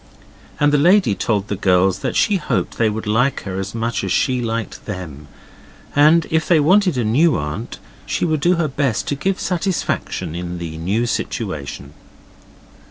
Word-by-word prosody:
And 145 0 +3
the 145 - +4
lady 180 - +4
told 100 0 -1
the 105 - -2
girls 95 -1 +2
that - - -3
she 205 - +3
hoped 170 - -2
they 115 -2 +3
would 110 +1 -4
like 120 +6 +1
her 95 -1 -4
as 95 - -5
much 115 +1 -2
as - - -2
she 130 -2 +1
liked 115 -1 -4
them, 80 -8 -7 0.7
and 155 +3 +5
if 160 -1 +1
they 170 -3 +4
wanted 180 +1 +3
a 120 - +1
new 145 +9 +3
aunt 75 +11 -5 0.3
she - - 0
would 155 -2 0
do 175 +5 +3
her 165 -2 0
best 135 -4 -1
to 145 - 0
give 190 +7 -1
satisfaction 180 - -2
in 90 0 -5
the 85 -2 -6
new 100 +8 0
situation. 75 - -4
115 Hz, 175 wpm, -19 LUFS, 95-155 Hz, 0.7 s, and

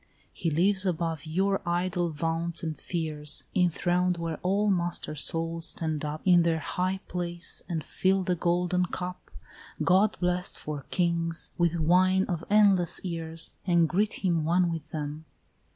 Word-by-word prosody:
He 165 - -2
lives 185 +5 +4
above 165 -4 -2
your 195 +4 0
idle 175 0 -1
vaunts 165 +2 -1
and 160 -2 -3
fears, 155 -4 -3
Enthroned 180 0 +1
where 165 -2 -4
all 200 +3 +1
master 175 -4 -1
souls 165 +2 +1
stand 155 -2 -2
up 150 +1 -4
In 180 -2 +6
their 165 -1 +1
high 185 +4 -2
place, 175 -1 +1
and 160 -4 -3
fill 190 0 +1
the 180 -1 0
golden 180 +1 0
cup, 180 +1 -6 0.5
God 195 +3 +3
blest 180 0 -1
for 145 -3 -6
kings, 170 -2 -1
with 170 -1 +1
wine 185 +4 +3
of 170 -4 -3
endless 200 -4 +4
years, 165 -2 -3
And 170 -2 +4
greet 200 +3 -1
him 170 -3 +1
one 175 +2 +2
with 160 -2 -6
them. 150 0 -5
175 Hz, 150 wpm, -27 LUFS, 165-180 Hz, 0.5 s, In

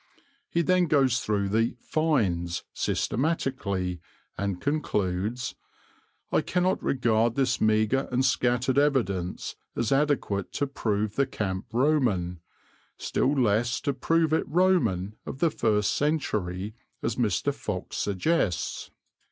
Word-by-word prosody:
He 170 - +1
then 180 +2 +3
goes 135 -5 +3
through 100 -3 0
the 115 +3 +1
"finds" 100 - 0
systematically, 100 - -1 0.3
and 100 -2 -2
concludes: 115 -4 -1 0.8
"I - - +3
cannot 185 +1 0
regard 115 -3 +1
this 130 -2 +1
meagre 110 +5 +2
and 130 +1 +2
scattered 125 +1 +2
evidence 100 -11 0 0.2
as 120 -2 -1
adequate 135 -9 +1
to 145 - 0
prove 110 -5 -2
the 140 -1 +3
camp 95 -2 -3
Roman, 115 - +1 0.6
still 135 - 0
less 120 +1 +2
to 140 - 0
prove 160 +4 +1
it 160 - +1
Roman 125 - +2
of - - -5
the 165 +3 +2
first 105 -6 +1
century, 105 - -1 0.3
as - - 0
Mr. - - +1
Fox - - -5
suggests. 100 - 0
120 Hz, 120 wpm, -27 LUFS, 100-145 Hz, 0.8 s, then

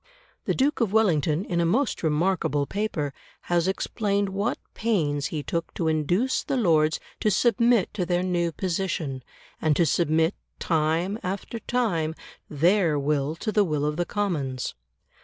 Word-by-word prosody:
The - - 0
Duke 280 +1 +1
of 220 -5 +1
Wellington, 175 -5 +2
in 170 -1 0
a - - +2
most 230 +11 +1
remarkable 155 -2 +1
paper, 160 -6 -2 0.3
has 175 0 +1
explained 200 +1 0
what 200 +5 -1 0.2
pains 155 -11 0
he 150 -3 -4
took 170 +2 -3
to 165 - -1
induce 175 - +1
the 270 - -2
Lords 160 -8 +3 0.2
to 215 - +2
submit 235 +1 +3
to 200 -3 -1
their 175 0 0
new 175 -2 0
position, 165 -5 -2 0.4
and 155 -2 +2
to 170 - +3
submit, 160 +2 +2 0.2
time 165 +5 0
after 195 +5 -4
time, 175 -12 0 0.3
their 165 +1 +3
will 145 +1 0
to 215 +6 -3
the 210 -1 +4
will 150 -5 -1
of 150 0 0
the 175 +2 -1
Commons. 150 -11 -2
175 Hz, 155 wpm, -25 LUFS, 155-205 Hz, 0.4 s, the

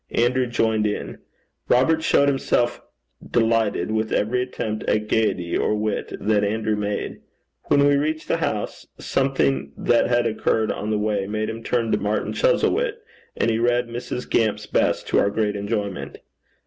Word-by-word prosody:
Andrew 125 +2 +2
joined 110 -2 +1
in. 105 - -4 0.5
Robert 160 +6 +3
showed 140 -2 +3
himself 125 -3 +1 0.4
delighted 115 -4 +1
with 110 0 -1
every 120 +4 +1
attempt 110 -4 -4
at 105 0 0
gaiety 100 -6 0
or 105 - +1
wit 105 -1 -2
that 105 -1 +1
Andrew 110 +1 0
made. 105 0 -3 0.4
When 140 0 +4
we 145 0 +4
reached 155 +2 -2
the - - +1
house, - - -3
something 70 - 0
that 120 - +2
had 120 -1 +2
occurred 110 0 +1
on 105 - -4
the 110 - +1
way 105 -2 -1
made 110 +1 -2
him 115 0 -7
turn 115 -2 0
to - - +2
Martin 105 +1 -1
Chuzzlewit, - - +2 0.4
and 115 - +2
he 110 - 0
read 120 0 +1
Mrs. 120 +1 -5
Gamp's 110 -3 +1
best - - +1
to - - +3
our 100 - +3
great 105 0 -1
enjoyment. 100 -1 -3
110 Hz, 160 wpm, -23 LUFS, 105-120 Hz, 0.5 s, When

